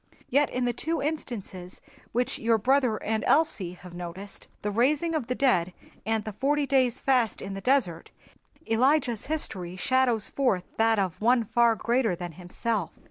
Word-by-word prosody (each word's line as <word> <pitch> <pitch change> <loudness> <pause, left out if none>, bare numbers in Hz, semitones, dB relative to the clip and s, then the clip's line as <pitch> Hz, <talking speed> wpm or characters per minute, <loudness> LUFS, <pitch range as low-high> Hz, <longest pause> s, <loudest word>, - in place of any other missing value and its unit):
Yet 285 +3 +3
in 250 0 -1
the 245 - 0
two 325 +7 -2
instances 215 - -5 0.3
which 245 +1 -1
your 230 0 +3
brother 250 0 +2
and 220 0 -1
Elsie 290 - +2
have 180 -1 -13
noticed, 180 +3 -8 0.2
the 210 - -1
raising 285 +9 +1
of 300 -7 -2
the 250 - -1
dead 185 -11 +2 0.3
and 220 -1 0
the 215 -1 -6
forty 285 +6 +1
days' 260 -3 +2
fast 250 -6 +1
in 195 - -6
the 195 - -6
desert, 225 -10 +1 0.6
Elijah's 250 0 +1
history 190 - -2
shadows 245 +1 +1
forth 250 -10 +1
that 225 0 +3
of 185 -2 -2
One 240 +2 +4
far 230 +1 +3
greater 235 -2 +1
than 175 0 -6
himself. 180 +3 -3
230 Hz, 165 wpm, -27 LUFS, 195-265 Hz, 0.6 s, One